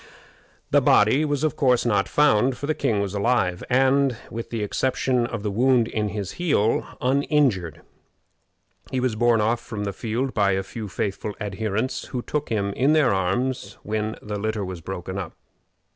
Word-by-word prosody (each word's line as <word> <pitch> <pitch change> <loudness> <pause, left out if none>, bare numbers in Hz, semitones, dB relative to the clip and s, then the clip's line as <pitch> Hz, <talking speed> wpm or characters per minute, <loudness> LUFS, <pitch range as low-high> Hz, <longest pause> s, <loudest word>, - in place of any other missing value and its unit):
The - - +5
body 110 +8 +4
was, 145 -1 -1
of 155 -1 +1
course, 130 -6 +2
not 100 -5 +1
found, 130 -3 +3
for 145 - -5
the 155 - +1
king 105 -8 0
was 100 -1 -3
alive, 100 -4 +1
and, 135 0 +3
with 115 0 -5
the 115 -3 -3
exception 125 +2 0
of 115 -4 -5
the 105 - -1
wound 120 +2 +3
in 105 -2 -2
his 100 -2 -4
heel, 115 -11 +1
uninjured. 130 - +1 1.1
He 130 - -1
was 125 -3 0
borne 120 0 +3
off 115 +2 +1
from 110 -3 -6
the 100 -1 -3
field 120 +5 -2
by 100 -2 +2
a 95 0 -1
few 110 +2 -7
faithful 100 +2 -3
adherents, 110 +3 -2
who 125 -2 -5
took 150 -1 -3
him 100 -3 -1
in 135 +7 +2
their 150 -9 +4
arms 100 +4 -1
when 110 +1 -2
the 105 -1 -4
litter 110 -1 -2
was 90 -2 -6
broken 95 +2 -5
up. 90 -5 -6
110 Hz, 175 wpm, -24 LUFS, 100-130 Hz, 1.1 s, The